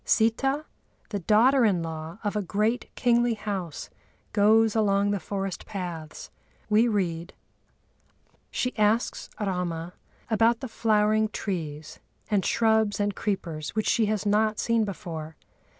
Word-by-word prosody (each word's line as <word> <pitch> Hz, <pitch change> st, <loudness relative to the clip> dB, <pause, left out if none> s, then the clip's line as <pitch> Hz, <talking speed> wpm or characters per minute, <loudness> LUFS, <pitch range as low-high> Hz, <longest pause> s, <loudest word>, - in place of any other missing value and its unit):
Sitâ, 270 Hz, +7 st, +2 dB, 0.4 s
the 205 Hz, -, -2 dB
daughter 235 Hz, +8 st, +4 dB
in 190 Hz, -6 st, +2 dB
law 160 Hz, +1 st, -6 dB
of 205 Hz, 0 st, -2 dB
a 210 Hz, -, +1 dB
great 210 Hz, +5 st, -1 dB
kingly 240 Hz, -1 st, +2 dB
house, 195 Hz, -7 st, -5 dB, 0.4 s
goes 220 Hz, +1 st, +4 dB
along 205 Hz, -2 st, +2 dB
the 200 Hz, -, 0 dB
forest 195 Hz, 0 st, -4 dB
paths. 175 Hz, -6 st, -6 dB, 0.4 s
We 220 Hz, +3 st, +5 dB
read: 175 Hz, -6 st, -1 dB, 1.2 s
"She 250 Hz, -, -2 dB
asks 215 Hz, +3 st, +1 dB
Râma 180 Hz, -4 st, -2 dB, 0.4 s
about 225 Hz, +2 st, +2 dB
the 260 Hz, -, -4 dB
flowering 215 Hz, -1 st, +2 dB
trees, 155 Hz, -8 st, -5 dB, 0.3 s
and 200 Hz, -3 st, +2 dB
shrubs 220 Hz, -2 st, +2 dB
and 205 Hz, 0 st, +1 dB
creepers 165 Hz, -7 st, -3 dB
which 215 Hz, -, 0 dB
she 225 Hz, -2 st, +3 dB
has 215 Hz, -1 st, -1 dB
not 215 Hz, +1 st, +2 dB
seen 230 Hz, -2 st, +1 dB
before. 160 Hz, -5 st, -6 dB
210 Hz, 130 wpm, -26 LUFS, 180-220 Hz, 1.2 s, We